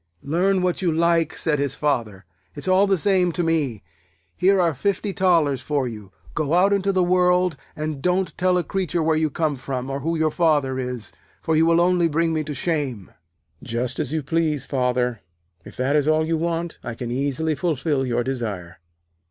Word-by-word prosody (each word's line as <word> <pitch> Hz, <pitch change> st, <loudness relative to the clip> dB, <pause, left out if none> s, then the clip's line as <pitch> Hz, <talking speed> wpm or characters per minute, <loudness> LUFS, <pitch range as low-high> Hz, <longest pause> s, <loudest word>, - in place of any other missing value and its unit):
'Learn 180 Hz, +5 st, +1 dB
what 180 Hz, 0 st, 0 dB
you 175 Hz, -3 st, +1 dB
like,' 165 Hz, 0 st, +2 dB
said 150 Hz, -3 st, 0 dB
his 140 Hz, -1 st, -1 dB
Father. 115 Hz, -10 st, -2 dB, 0.3 s
'It's -, -, -5 dB
all 190 Hz, +2 st, +4 dB
the 195 Hz, -1 st, +2 dB
same 185 Hz, -1 st, +2 dB
to 175 Hz, -, -1 dB
me. 150 Hz, -10 st, 0 dB, 0.5 s
Here 195 Hz, +1 st, +3 dB
are 170 Hz, -3 st, +2 dB
fifty 200 Hz, +7 st, -1 dB
thalers 165 Hz, -8 st, +2 dB
for 145 Hz, -4 st, -1 dB
you. 105 Hz, -5 st, -9 dB, 0.2 s
Go 155 Hz, +1 st, 0 dB
out 195 Hz, +3 st, +4 dB
into 200 Hz, 0 st, +1 dB
the 185 Hz, -1 st, +2 dB
world, 180 Hz, -1 st, +3 dB, 0.2 s
and 155 Hz, -2 st, -4 dB
don't 180 Hz, 0 st, 0 dB
tell 185 Hz, 0 st, +2 dB
a 175 Hz, -, +1 dB
creature 180 Hz, -3 st, -1 dB
where 160 Hz, 0 st, +2 dB
you 155 Hz, 0 st, +1 dB
come 150 Hz, -1 st, -1 dB
from, 130 Hz, 0 st, -4 dB
or 135 Hz, -, -3 dB
who 165 Hz, +4 st, -1 dB
your 155 Hz, -1 st, +1 dB
Father 145 Hz, -6 st, +1 dB
is, 125 Hz, -3 st, -4 dB, 0.3 s
for 160 Hz, -, +1 dB
you 160 Hz, +1 st, +4 dB
will 165 Hz, 0 st, +4 dB
only 175 Hz, -1 st, +3 dB
bring 165 Hz, +1 st, +1 dB
me 155 Hz, -1 st, 0 dB
to 150 Hz, -1 st, -5 dB
shame.' 135 Hz, -, -2 dB, 0.5 s
'Just 120 Hz, +2 st, -3 dB
as 145 Hz, -4 st, -2 dB
you 155 Hz, -1 st, -1 dB
please, 150 Hz, -2 st, 0 dB
Father. 125 Hz, -3 st, 0 dB, 0.5 s
If -, -, -12 dB
that 130 Hz, +3 st, +1 dB
is 150 Hz, -1 st, +2 dB
all 155 Hz, 0 st, +3 dB
you 165 Hz, +1 st, 0 dB
want, 170 Hz, +1 st, -2 dB
I 120 Hz, -, -5 dB
can 120 Hz, 0 st, -5 dB
easily 140 Hz, +5 st, -1 dB
fulfil 150 Hz, -2 st, -1 dB
your 120 Hz, -1 st, 0 dB
desire.' 105 Hz, -9 st, -4 dB
155 Hz, 195 wpm, -23 LUFS, 135-175 Hz, 0.5 s, all